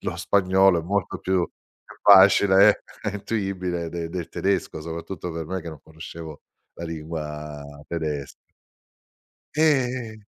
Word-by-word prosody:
lo -, -, -3 dB
spagnolo 95 Hz, -2 st, +3 dB
è -, -, -10 dB
molto 100 Hz, +2 st, -2 dB
più 95 Hz, 0 st, 0 dB, 0.4 s
più -, -, -15 dB
facile 100 Hz, +1 st, +7 dB, 0.2 s
e 105 Hz, -, -1 dB
intuibile 95 Hz, -5 st, -3 dB
de 85 Hz, 0 st, -5 dB
del 85 Hz, -2 st, -5 dB
tedesco, 95 Hz, -5 st, -1 dB
soprattutto 85 Hz, +2 st, -6 dB
per 80 Hz, -1 st, -5 dB
me, 95 Hz, +2 st, -3 dB
che 85 Hz, -, -7 dB
non 80 Hz, -3 st, -9 dB
conoscevo 80 Hz, -1 st, -10 dB, 0.3 s
la 85 Hz, -, -7 dB
lingua 75 Hz, -2 st, -6 dB, 0.2 s
tedesca. 75 Hz, -4 st, -4 dB, 1.2 s
E 125 Hz, -8 st, +1 dB
90 Hz, 125 wpm, -24 LUFS, 80-100 Hz, 1.2 s, facile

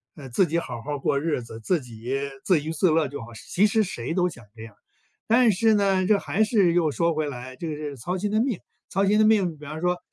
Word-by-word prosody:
呃， 140 Hz, -4 st, -10 dB
自 175 Hz, +10 st, +2 dB
己 170 Hz, +2 st, 0 dB
好 120 Hz, -7 st, -6 dB
好 145 Hz, +2 st, -4 dB
过 140 Hz, +1 st, +1 dB
日 150 Hz, -3 st, -1 dB
子， 115 Hz, -1 st, -10 dB
自 170 Hz, +9 st, +1 dB
己 120 Hz, +2 st, -5 dB, 0.3 s
自 180 Hz, -6 st, +3 dB
娱 160 Hz, -, -3 dB
自 170 Hz, +3 st, +2 dB
乐 155 Hz, -2 st, +2 dB
就 145 Hz, -, -7 dB
好， 120 Hz, +1 st, -10 dB, 0.2 s
其 205 Hz, +4 st, +4 dB
实 220 Hz, +1 st, +2 dB
谁 160 Hz, -, -4 dB
都 180 Hz, 0 st, +2 dB
想 120 Hz, -7 st, -12 dB
这 110 Hz, -, -10 dB
样。 110 Hz, -2 st, -12 dB, 0.5 s
但 235 Hz, 0 st, +5 dB
是 220 Hz, +4 st, +3 dB
呢， 195 Hz, -2 st, +2 dB
这 210 Hz, -, +5 dB
还 220 Hz, -, +1 dB
是 205 Hz, -6 st, +3 dB
又 165 Hz, -3 st, +2 dB
说 170 Hz, +3 st, +1 dB
回 155 Hz, -1 st, -1 dB
来 130 Hz, 0 st, -8 dB
就 165 Hz, -, -5 dB
是 150 Hz, -2 st, -5 dB
操 180 Hz, +10 st, -3 dB
心 205 Hz, +2 st, -2 dB
的 215 Hz, -, +2 dB
命。 245 Hz, -6 st, 0 dB, 0.3 s
操 195 Hz, +1 st, +2 dB
心 210 Hz, +2 st, +3 dB
的 -, -, +6 dB
命， 195 Hz, -7 st, +3 dB
比 150 Hz, 0 st, -13 dB
方 155 Hz, +2 st, -6 dB
说， 180 Hz, 0 st, 0 dB
165 Hz, 275 characters per minute, -25 LUFS, 140-195 Hz, 0.5 s, 的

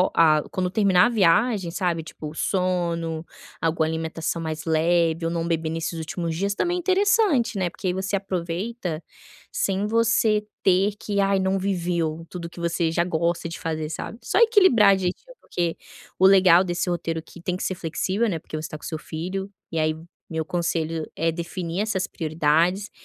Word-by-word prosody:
a 155 Hz, -2 st, +5 dB
quando 185 Hz, -1 st, -1 dB
terminar 190 Hz, -1 st, +4 dB
a -, -, 0 dB
viagem, 205 Hz, -1 st, +3 dB
sabe, 170 Hz, -2 st, -1 dB
tipo 155 Hz, -1 st, -8 dB
o -, -, -11 dB
sono, 170 Hz, -3 st, -1 dB, 0.4 s
alguma 160 Hz, -1 st, +1 dB
alimentação 160 Hz, +1 st, -3 dB
mais 155 Hz, -1 st, -4 dB
leve 165 Hz, 0 st, +2 dB
ou 165 Hz, -, +1 dB
não 165 Hz, -1 st, -1 dB
beber 165 Hz, -1 st, -1 dB
nesses 165 Hz, +1 st, -3 dB
últimos 165 Hz, +1 st, -3 dB
dias 200 Hz, +4 st, -1 dB
também 350 Hz, +1 st, 0 dB
é -, -, -1 dB
interessante, 375 Hz, -, +2 dB
né, 180 Hz, -2 st, 0 dB
porque 185 Hz, -, -6 dB
aí 180 Hz, -, +1 dB
você 190 Hz, +2 st, -2 dB
aproveita 180 Hz, -1 st, -3 dB, 0.5 s
sem 200 Hz, -, 0 dB
você 220 Hz, -1 st, +2 dB, 0.2 s
ter 195 Hz, +2 st, +3 dB
que: 205 Hz, -2 st, -2 dB
"Ai, 195 Hz, 0 st, +3 dB
não 190 Hz, +1 st, +1 dB
viveu 170 Hz, -4 st, -1 dB
tudo 170 Hz, -2 st, -6 dB
que 170 Hz, -, -18 dB
você 170 Hz, -1 st, 0 dB
já 170 Hz, +1 st, +1 dB
gosta 170 Hz, 0 st, -1 dB
de 165 Hz, -, -7 dB
fazer." 155 Hz, -1 st, -3 dB
Sabe, 220 Hz, +7 st, -6 dB
só 380 Hz, -, +1 dB
equilibrar 375 Hz, -, +6 dB
direitinho, 190 Hz, -, -4 dB
porque 170 Hz, -2 st, -2 dB, 0.4 s
o 190 Hz, -, +4 dB
legal 185 Hz, -2 st, +7 dB
desse 180 Hz, 0 st, -2 dB
roteiro 165 Hz, -2 st, -2 dB
aqui 165 Hz, +1 st, -13 dB
tem 180 Hz, +1 st, -2 dB
que -, -, -5 dB
ser 185 Hz, -, -1 dB
flexível, 185 Hz, +7 st, -1 dB
né, 165 Hz, -4 st, -2 dB
porque 155 Hz, -, -9 dB
você 155 Hz, 0 st, -4 dB
tá 155 Hz, -, -6 dB
com -, -, -12 dB
seu 160 Hz, -, -3 dB
filho. 185 Hz, +6 st, -5 dB, 0.2 s
E 165 Hz, -, -4 dB
aí, 155 Hz, 0 st, +2 dB, 0.4 s
meu 160 Hz, -1 st, -2 dB
conselho 165 Hz, -2 st, -1 dB
é 165 Hz, +1 st, 0 dB
definir 170 Hz, +2 st, -3 dB
essas 200 Hz, -3 st, -1 dB
prioridades 165 Hz, +5 st, +1 dB
175 Hz, 180 wpm, -24 LUFS, 165-195 Hz, 0.5 s, legal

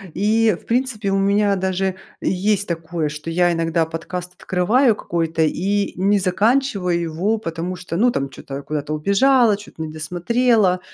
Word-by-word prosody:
И, 220 Hz, +2 st, +2 dB
в -, -, -24 dB
принципе, 230 Hz, -4 st, -1 dB
у 195 Hz, -, +2 dB
меня 200 Hz, +1 st, +2 dB
даже 190 Hz, 0 st, -1 dB, 0.2 s
есть 200 Hz, +2 st, 0 dB
такое, 165 Hz, -2 st, -3 dB
что 150 Hz, +2 st, -7 dB
я 175 Hz, +1 st, +2 dB
иногда 165 Hz, 0 st, 0 dB
подкаст 175 Hz, +2 st, -6 dB
открываю 220 Hz, +9 st, +2 dB
какой-то 165 Hz, -3 st, -1 dB
и 200 Hz, +6 st, 0 dB
не 195 Hz, +3 st, +2 dB
заканчиваю 195 Hz, -1 st, +1 dB
его, 170 Hz, +7 st, -1 dB
потому 170 Hz, -1 st, -4 dB
что, 175 Hz, -1 st, -6 dB
ну, 240 Hz, +7 st, +3 dB
там, 140 Hz, -9 st, -2 dB
чё-то 135 Hz, +1 st, -8 dB
куда-то 150 Hz, 0 st, -3 dB
убежала, 215 Hz, -, +3 dB
чё-то 200 Hz, -5 st, -11 dB
не 155 Hz, -, -6 dB
досмотрела. 185 Hz, +5 st, +1 dB
185 Hz, 155 wpm, -20 LUFS, 165-210 Hz, 0.2 s, ну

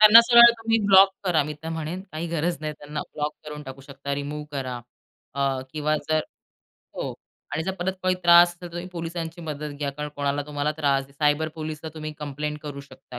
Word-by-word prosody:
त्यांना 215 Hz, +2 st, +11 dB
सरळ 235 Hz, 0 st, +9 dB
तुम्ही 225 Hz, 0 st, +1 dB
ब्लॉक 195 Hz, 0 st, +8 dB
करा 165 Hz, -5 st, +3 dB
मी 150 Hz, +1 st, -5 dB
तर 160 Hz, -, -5 dB
म्हणेन, 165 Hz, +3 st, -4 dB
काही 160 Hz, +2 st, -3 dB
गरज 170 Hz, +1 st, -1 dB
नाही. 155 Hz, 0 st, -3 dB
त्यांना 150 Hz, +1 st, -5 dB
ब्लॉक 150 Hz, 0 st, -2 dB
करून 150 Hz, -1 st, -7 dB
टाकू 135 Hz, -1 st, -9 dB
शकता, 140 Hz, +1 st, -5 dB
रिमूव्ह 145 Hz, +1 st, -4 dB
करा. 130 Hz, -3 st, -4 dB, 0.5 s
अ, 135 Hz, -1 st, 0 dB
किंवा 155 Hz, 0 st, 0 dB
जर 155 Hz, 0 st, +3 dB, 0.8 s
हो -, -, -3 dB, 0.4 s
आणि 160 Hz, -, -1 dB
जर 190 Hz, -, -1 dB
परत 190 Hz, 0 st, -2 dB
काही 185 Hz, 0 st, +2 dB
त्रास 175 Hz, 0 st, +8 dB
असेल, 175 Hz, 0 st, -12 dB
तर 175 Hz, -, -8 dB
तुम्ही 175 Hz, +1 st, -5 dB
पोलिसांची 165 Hz, 0 st, -5 dB
मदत 150 Hz, -2 st, -5 dB
घ्या. 145 Hz, -1 st, -1 dB
कारण 150 Hz, +1 st, -5 dB
कोणाला 145 Hz, 0 st, 0 dB
तुम्हाला 150 Hz, 0 st, -1 dB
त्रास 140 Hz, -3 st, +1 dB
आहे. 140 Hz, -, -21 dB
सायबर 150 Hz, +2 st, +1 dB
पोलीसला 155 Hz, 0 st, -6 dB
तुम्ही 155 Hz, -1 st, -5 dB
कंप्लेंट 150 Hz, +1 st, -4 dB
करू 145 Hz, -2 st, -6 dB
शकता. 130 Hz, -3 st, -12 dB
150 Hz, 200 wpm, -25 LUFS, 145-170 Hz, 0.8 s, त्यांना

